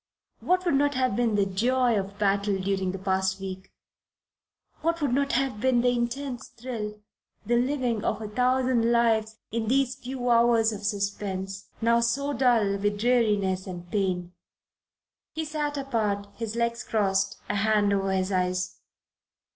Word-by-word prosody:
what 365 +1 +1
would 345 - +2
not 285 0 +2
have 255 -4 +1
been 230 -2 +1
the 200 -1 +3
joy 240 +5 +2
of 200 0 -3
battle 200 0 +1
during 190 -1 -1
the 190 - -5
past 190 0 0
week, 190 -1 -7 1.1
what 335 +1 0
would 285 -5 0
not 275 +1 +1
have 255 -4 0
been 255 -2 +3
the 245 - +3
intense 245 +1 -2
thrill, 220 -4 -6 0.5
the 240 - +2
living 245 -3 0
of 215 - -1
a 215 - -5
thousand 250 +1 +2
lives 225 -2 +2
in 225 -1 -2
these 260 +1 +2
few 255 -1 -5
hours 235 -1 +4
of 210 -1 -7
suspense 200 -1 -3 0.2
now 235 +1 +4
so 275 +5 0
dull 230 -7 +3
with 205 +1 0
dreariness 210 -6 +2
and 175 -1 -8
pain! 180 -3 -1 1.0
He 320 0 -3
sat 295 -1 -2
apart, 220 -7 -1
his 225 +1 -5
legs 235 0 -1
crossed, 195 -2 0
a 205 - -1
hand 205 -1 +2
over 195 -1 0
his 190 0 0
eyes. 185 0 -1
225 Hz, 155 wpm, -27 LUFS, 200-250 Hz, 1.1 s, hours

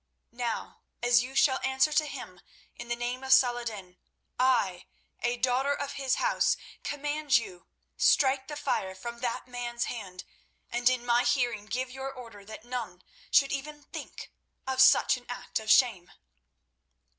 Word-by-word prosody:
Now, 235 -1 -4 0.2
as 240 0 +5
you 260 +2 -7
shall 265 -1 +4
answer 265 +3 +2
to 305 0 +2
him, 185 -11 -8 0.3
in - - -9
the 240 - -1
name 245 +2 -4
of 265 0 +4
Saladin 235 -8 +1 0.4
I, 240 -9 +2 0.3
a 245 0 0
daughter 260 +3 +1
of 285 -1 -4
his 270 -2 0
House, - - +2 0.3
command 290 -1 +1
you, 180 -6 -7 0.3
strike 265 -1 +3
the 295 - -6
fire 190 -9 -2
from 235 +5 -7
that 240 0 -3
man's 240 -1 -3
hand, 190 -6 -6 0.5
and 245 +1 +3
in 250 -1 -1
my 240 0 +3
hearing 240 -4 0
give 255 +3 -3
your 265 +1 -5
order 230 -6 -11
that 215 +2 -11
none 235 -7 -5 0.3
should 275 -1 +4
even 295 +2 -5
think - - -9 0.3
of 260 0 +1
such 260 0 +6
an 245 - -16
act 245 - -4
of 220 0 -8
shame." 220 -8 +4
245 Hz, 155 wpm, -29 LUFS, 235-265 Hz, 0.5 s, such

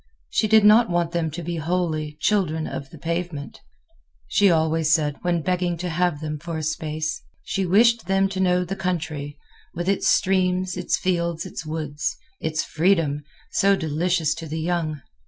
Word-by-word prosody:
She 215 - +2
did 220 0 +5
not 220 +2 +6
want 175 -1 0
them 170 -2 0
to 165 +3 -6
be 170 +1 -3
wholly 155 -2 -1
"children 165 -7 +1
of 135 -1 -6
the 160 - -12
pavement," 165 -2 -4 0.7
she 205 -1 +4
always 160 -1 +2
said 150 -2 +2
when 175 -2 0
begging 180 -1 0
to 180 +2 -3
have 170 -2 0
them 155 -1 -4
for 165 +1 -5
a 155 - -4
space. 155 0 -2 0.2
She 195 -1 -1
wished 225 +2 +4
them 195 0 +3
to 190 -1 -4
know 180 -1 +2
the 190 +3 -4
country, 155 -6 -3 0.4
with 175 +1 -3
its 195 0 +1
streams, 185 -1 +2
its 180 -1 0
fields, 170 -2 -1
its 160 - -7
woods, 155 -2 -3 0.2
its 155 0 -1
freedom, 160 -4 +1 0.3
so 200 0 +4
delicious 165 0 0
to 165 -1 -6
the 160 +2 -4
young. 160 -3 -1
170 Hz, 175 wpm, -23 LUFS, 155-185 Hz, 0.7 s, not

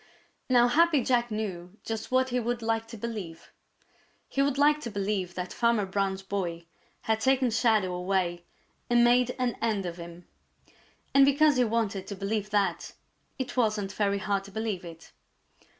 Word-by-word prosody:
Now 245 -1 +5
Happy 310 +1 +3
Jack 240 -1 +1
knew 200 -3 -5
just 225 -1 -4
what 260 0 +2
he 250 0 0
would 240 0 -2
like 225 0 -1
to 230 0 -9
believe. 205 -7 -7 0.8
He 275 - -1
would 280 -1 +1
like 295 +1 +4
to 235 - -5
believe 195 -3 -2
that 180 0 -5
Farmer 235 -3 +2
Brown's 195 0 -2
boy 175 -4 -3 0.4
had 220 0 0
taken 265 0 +2
Shadow 220 -5 +2
away 180 -1 -1 0.5
and 240 0 +5
made 245 +1 +3
an 250 -2 -1
end 215 -4 0
of 175 -1 -5
him. 170 0 -10 0.9
And 275 - +7
because 285 +1 +4
he 250 - +4
wanted 215 -4 -1
to 200 - -5
believe 210 +1 -2
that, 205 -2 0 0.4
it 260 -1 -4
wasn't 215 -5 0
very 200 -1 0
hard 200 0 -1
to 200 - -12
believe 220 -3 -3
it. 165 -1 -11
220 Hz, 165 wpm, -28 LUFS, 195-245 Hz, 0.9 s, And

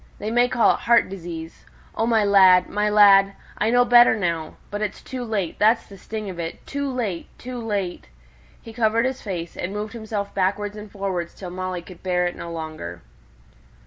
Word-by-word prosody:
They 215 +2 -4
may 245 +1 +3
call 250 -3 +4
it - - -5
heart 235 -3 +3
disease 170 -3 -8 0.3
O 225 - -1
my 225 -2 +3
lad, 190 -2 +6
my 210 0 0
lad, 200 -2 +6 0.3
I 215 - +2
know 245 +1 +4
better 240 -1 +7
now; 170 -6 -2 0.2
but 205 +1 -4
it's 210 -2 -3
too 255 -1 -5
late 205 -7 -3
that's 225 +2 +3
the 200 - -13
sting 215 +2 -6
of 180 -3 -7
it 165 -1 -6
too 280 0 -3
late, 215 -9 -3
too 250 0 -7
late!" 200 - -3 0.5
He 225 - -12
covered 230 0 +2
his 260 0 -2
face, 175 -5 -5
and 185 +3 -4
moved 210 +2 -4
himself 220 -3 -4
backward 205 +2 -1
and 210 -1 -10
forward 190 -4 -3
till 180 -2 -9
Molly 185 -1 -4
could 180 -1 -13
bear 180 -1 0
it 175 - -2
no 170 - -7
longer. 155 - -7
200 Hz, 195 wpm, -23 LUFS, 180-225 Hz, 0.5 s, better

